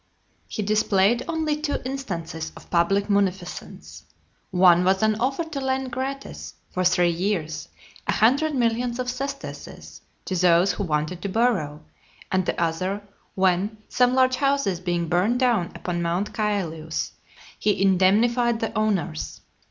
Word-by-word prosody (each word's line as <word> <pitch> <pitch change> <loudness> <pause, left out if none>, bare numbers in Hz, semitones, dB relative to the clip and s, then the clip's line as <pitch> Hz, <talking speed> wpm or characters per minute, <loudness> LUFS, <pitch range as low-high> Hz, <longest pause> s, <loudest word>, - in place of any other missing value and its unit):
XLVIII. - - -17
He - - -1
displayed 210 +2 +2
only 320 -2 0
two 305 -2 0
instances 170 -12 -4
of - - -15
public 195 +4 +2
munificence. 195 -3 -2 0.5
One 180 -1 +5
was 190 +2 +2
an 220 0 +4
offer 270 +7 0
to 310 -4 -5
lend 265 -1 -1
gratis, 270 +2 -5 0.2
for 185 - -1
three 180 -1 +3
years, 165 -4 -2 0.4
a - - +2
hundred 280 +7 +3
millions 240 0 0
of 250 -1 -2
sesterces 270 +3 -7 0.2
to 190 - -2
those 180 +1 +4
who 195 +3 -3
wanted 155 +2 -2
to 200 - -3
borrow; 185 -10 0 0.5
and 185 -1 +1
the - - -1
other, 185 +5 -1 0.3
when, 190 +3 +1
some 250 +1 +3
large 255 0 +3
houses 275 -10 +1
being 175 -2 -1
burnt 180 +8 +2
down 235 -9 +1
upon 175 -1 -3
Mount 175 +4 -1
Caelius, 170 -7 -2 0.5
he 210 -3 +1
indemnified 220 +5 +3
the 225 - -3
owners. 190 - -1
200 Hz, 145 wpm, -24 LUFS, 175-245 Hz, 0.5 s, One